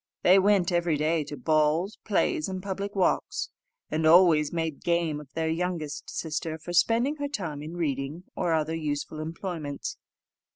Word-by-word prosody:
They 185 Hz, +2 st, +7 dB
went 195 Hz, -2 st, +3 dB
every 175 Hz, -3 st, +1 dB
day 155 Hz, +1 st, +1 dB
to 145 Hz, 0 st, -7 dB
balls, 155 Hz, -, +1 dB
plays, 195 Hz, -5 st, +1 dB
and 185 Hz, -1 st, -5 dB
public 200 Hz, +1 st, -4 dB
walks, 190 Hz, -2 st, 0 dB, 0.4 s
and 160 Hz, -, 0 dB
always 160 Hz, -3 st, +6 dB
made 160 Hz, -3 st, -2 dB
game 170 Hz, -3 st, +1 dB
of 145 Hz, -2 st, -13 dB
their 160 Hz, 0 st, -1 dB
youngest 160 Hz, -3 st, -3 dB
sister 160 Hz, 0 st, -3 dB
for 175 Hz, +2 st, -7 dB
spending 235 Hz, -, +3 dB
her 285 Hz, -1 st, -2 dB
time 165 Hz, -, -4 dB
in 160 Hz, +3 st, -7 dB
reading 145 Hz, +1 st, -2 dB
or 170 Hz, -, 0 dB
other 160 Hz, 0 st, +1 dB
useful 155 Hz, -1 st, -3 dB
employments. 160 Hz, -2 st, -5 dB
165 Hz, 160 wpm, -27 LUFS, 155-180 Hz, 0.4 s, They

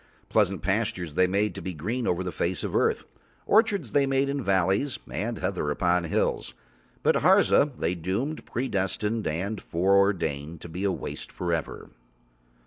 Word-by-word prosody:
Pleasant -, -, +2 dB
pastures 85 Hz, -4 st, -1 dB
They 90 Hz, +4 st, +3 dB
made 100 Hz, +3 st, +1 dB
to -, -, -7 dB
be 95 Hz, -2 st, -5 dB
green 110 Hz, +11 st, -2 dB
over 90 Hz, +1 st, 0 dB
the 90 Hz, -, -3 dB
face 90 Hz, +1 st, -2 dB
of -, -, -3 dB
earth, -, -, +1 dB, 0.4 s
orchards 205 Hz, -, +3 dB
They 140 Hz, -1 st, +3 dB
made 135 Hz, +1 st, +1 dB
in 140 Hz, 0 st, -1 dB
valleys 95 Hz, +6 st, +1 dB
and 115 Hz, +2 st, -3 dB
heather 90 Hz, -5 st, -2 dB
upon 90 Hz, +3 st, +1 dB
hills, 80 Hz, -, -1 dB, 0.5 s
but -, -, +4 dB
Harza 145 Hz, -, +5 dB
They 85 Hz, +2 st, 0 dB
doomed, 95 Hz, -, -3 dB
predestined 105 Hz, -2 st, -1 dB
and 95 Hz, +7 st, -2 dB
foreordained 85 Hz, -5 st, +1 dB
to 85 Hz, -, -9 dB
be 90 Hz, +5 st, -4 dB
a 100 Hz, -, +2 dB
waste -, -, -6 dB
for 85 Hz, -2 st, -2 dB
ever. 80 Hz, -2 st, -4 dB
95 Hz, 160 wpm, -27 LUFS, 85-115 Hz, 0.5 s, Harza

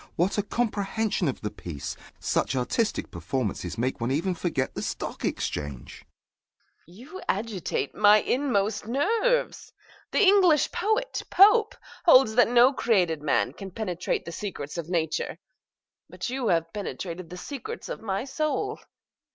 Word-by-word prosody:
What 185 Hz, +5 st, +1 dB
a -, -, +4 dB
comprehension 215 Hz, -3 st, -1 dB
of 135 Hz, -, -3 dB
the 105 Hz, -, -3 dB
piece! 75 Hz, -9 st, -6 dB, 0.2 s
Such -, -, 0 dB
artistic 130 Hz, -, -1 dB
performances 110 Hz, -7 st, -3 dB
make 125 Hz, +1 st, -1 dB
one 115 Hz, -, 0 dB
even 165 Hz, +8 st, 0 dB
forget 165 Hz, -6 st, -2 dB
the -, -, -5 dB
stock -, -, -5 dB
exchange! 70 Hz, -4 st, -4 dB
MRS. -, -, -17 dB
GOLD. 175 Hz, +3 st, -26 dB
You 310 Hz, -, -10 dB
agitate 205 Hz, -2 st, -2 dB
my 210 Hz, 0 st, +6 dB
inmost 215 Hz, -6 st, 0 dB
nerves! 445 Hz, -, 0 dB, 0.4 s
The -, -, +2 dB
English 375 Hz, -6 st, +5 dB
poet, 440 Hz, +4 st, -1 dB
Pope, 425 Hz, +3 st, +6 dB, 0.3 s
holds 260 Hz, -9 st, +6 dB
that 245 Hz, 0 st, +5 dB
no 245 Hz, +3 st, +6 dB
created 180 Hz, -, +1 dB
man 150 Hz, -, +1 dB
can 195 Hz, -1 st, -8 dB
penetrate 180 Hz, -3 st, -3 dB
the 170 Hz, -, -6 dB
secrets 165 Hz, -7 st, -6 dB
of 165 Hz, 0 st, -6 dB
nature; 160 Hz, -2 st, -1 dB, 0.7 s
but -, -, -5 dB
you 260 Hz, -2 st, -2 dB
have 165 Hz, -2 st, +1 dB
penetrated 185 Hz, -4 st, -5 dB
the 180 Hz, -, -8 dB
secrets 275 Hz, +6 st, -7 dB
of -, -, -6 dB
my 200 Hz, -1 st, -2 dB
soul. 305 Hz, +3 st, -2 dB
200 Hz, 145 wpm, -26 LUFS, 165-255 Hz, 0.7 s, my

